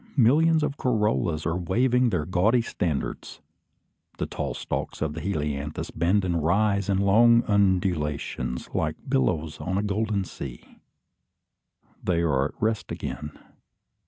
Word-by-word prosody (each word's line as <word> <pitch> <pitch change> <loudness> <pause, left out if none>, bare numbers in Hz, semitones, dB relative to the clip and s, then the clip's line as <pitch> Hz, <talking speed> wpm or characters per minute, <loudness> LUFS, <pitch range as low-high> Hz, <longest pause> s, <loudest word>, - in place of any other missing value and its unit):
Millions 155 +6 +4
of 145 -1 -2
corollas 105 - 0
are 80 +2 0
waving 120 +8 +2
their 85 -8 -1
gaudy 100 +8 +2
standards. 80 - -3 0.8
The - - -1
tall - - -4
stalks - - -4
of 80 -1 -2
the 80 - -6
helianthus 75 -5 -3
bend 90 +4 +1
and 85 -3 0
rise 100 +3 +2
in 95 - +2
long 115 +4 +5
undulations, 90 -10 0
like - - 0
billows 75 +4 0
on 95 +1 -2
a 100 - 0
golden 105 0 0
sea. 65 -8 -9 1.2
They 85 -2 +1
are 70 -5 +2
at 75 - -5
rest 110 -4 -1
again. 75 -1 -5
95 Hz, 130 wpm, -26 LUFS, 80-110 Hz, 1.2 s, long